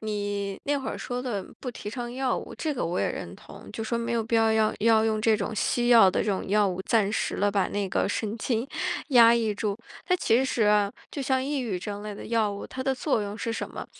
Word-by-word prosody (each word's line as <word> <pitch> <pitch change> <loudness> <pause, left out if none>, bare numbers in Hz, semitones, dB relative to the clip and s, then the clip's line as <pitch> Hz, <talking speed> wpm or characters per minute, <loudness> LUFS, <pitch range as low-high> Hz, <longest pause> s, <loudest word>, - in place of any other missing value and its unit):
你 205 -2 -3
那 285 0 +1
会 265 - -5
儿 - - -5
说 245 0 -4
的 215 -7 -3 0.2
不 255 - -4
提 210 -3 -7
倡 240 0 -5
药 260 0 0
物， - - -9
这 310 - -2
个 265 - -2
我 175 +2 -2
也 - - +1
认 - - -7
同。 - - -13
就 225 - -4
说 235 +1 -1
没 235 0 -2
有 230 -1 0
必 230 +1 -2
要 225 0 +4
要 220 -1 +2
要 220 0 +4
用 220 -1 +1
这 220 0 +3
种 210 +1 -3
西 240 +3 0
药 230 -6 +8
的 - - 0
这 210 - 0
种 190 - -2
药 205 +1 +3
物， 185 0 -3
暂 210 0 +2
时 - - -1
地 205 0 +2
把 195 -2 +1
那 205 -1 -2
个 - - 0
神 215 +1 -2
经 230 +2 -1 0.4
压 235 -4 +7
抑 225 -3 0
住。 205 -1 -2 0.3
它 365 - +3
其 245 -7 +3
实 245 -3 0
啊， 210 -1 +3 0.2
就 285 - -5
像 265 -1 0
抑 285 0 -1
郁 215 -8 -2
症 205 +2 -6
类 210 -1 -6
的 - - -9
药 225 -2 +1
物， 200 - -7
它 260 - -5
的 265 0 0
作 260 -2 0
用 205 0 -5
是 230 +1 -3
什 - - -4
么？ - - -7
220 Hz, 285 characters per minute, -26 LUFS, 205-240 Hz, 0.4 s, 药